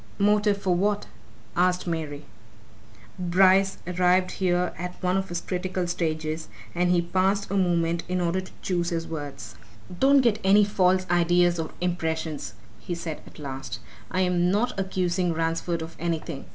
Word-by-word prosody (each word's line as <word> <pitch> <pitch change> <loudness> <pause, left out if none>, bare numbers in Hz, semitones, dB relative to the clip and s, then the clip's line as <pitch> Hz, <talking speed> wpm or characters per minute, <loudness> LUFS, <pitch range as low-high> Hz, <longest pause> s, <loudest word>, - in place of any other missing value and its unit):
"Motive 210 0 +3
for 190 -2 +1
what?" 205 +3 +1 0.5
asked 180 0 +2
Mary. 155 -4 -4 0.9
Bryce 190 +2 +4
arrived 180 +1 +2
here 180 -1 0
at 180 +1 -5
one 180 0 +2
of 195 0 -1
his 175 0 -3
critical 185 0 -2
stages, 160 -2 -2 0.2
and 175 +1 +1
he 175 -1 +3
paused 190 +3 0
a - - -1
moment 170 -3 +1
in 185 0 0
order 175 +1 0
to 185 - -12
choose 175 -2 0
his 165 -2 -2
words. 140 -7 -6 0.5
"Don't 275 +1 +6
get 230 -4 +2
any 200 +2 +6
false 185 -2 +2
ideas 175 0 +3
or 160 - -2
impressions," 160 -7 -2 0.2
he 175 - -4
said 165 -2 -5
at - - -15
last. 135 -5 -6 0.3
"I'm 180 -1 +2
not 215 +6 +1
accusing 185 -2 0
Ransford 165 +1 -1
of 160 - -9
anything. 160 -4 -3
180 Hz, 150 wpm, -26 LUFS, 165-185 Hz, 0.9 s, Don't